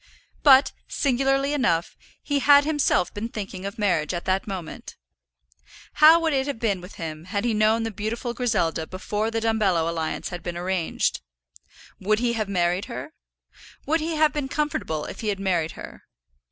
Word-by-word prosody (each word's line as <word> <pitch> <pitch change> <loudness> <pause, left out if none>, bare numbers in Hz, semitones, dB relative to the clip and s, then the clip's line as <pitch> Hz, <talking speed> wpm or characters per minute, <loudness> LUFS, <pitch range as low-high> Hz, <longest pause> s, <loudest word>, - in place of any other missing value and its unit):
But, 270 -1 +6 0.2
singularly 270 +1 +1
enough, 230 - 0 0.3
he 285 -1 0
had 285 +1 +6
himself 295 - +1
been 220 +3 -4
thinking 195 -3 -6
of 200 - -8
marriage 180 -6 0
at 175 - -5
that 190 +2 0
moment. 185 -5 -7 1.0
How 315 +2 +7
would 325 -2 0
it 265 0 0
have 285 - -3
been 205 -5 -1
with 180 +3 -11
him 160 -2 -6
had 200 +3 -2
he 235 - +1
known 215 +2 +2
the 225 - -3
beautiful 220 +4 -4
Griselda 170 -10 0
before 205 +3 -3
the 225 0 -1
Dumbello 205 -7 +1
alliance 165 -1 -3
had 175 -1 -6
been 175 -1 -5
arranged? 180 - -1 0.8
Would 210 +2 +1
he 235 +1 0
have 215 -3 -2
married 180 +1 0
her? 265 +5 -7 0.7
Would 320 +3 +1
he 320 +1 -2
have 305 -1 +3
been 295 -3 -2
comfortable 275 - -2
if - - -8
he 220 - -4
had 200 -2 -1
married 175 -5 0
her? - - -10
215 Hz, 175 wpm, -24 LUFS, 180-270 Hz, 1.0 s, How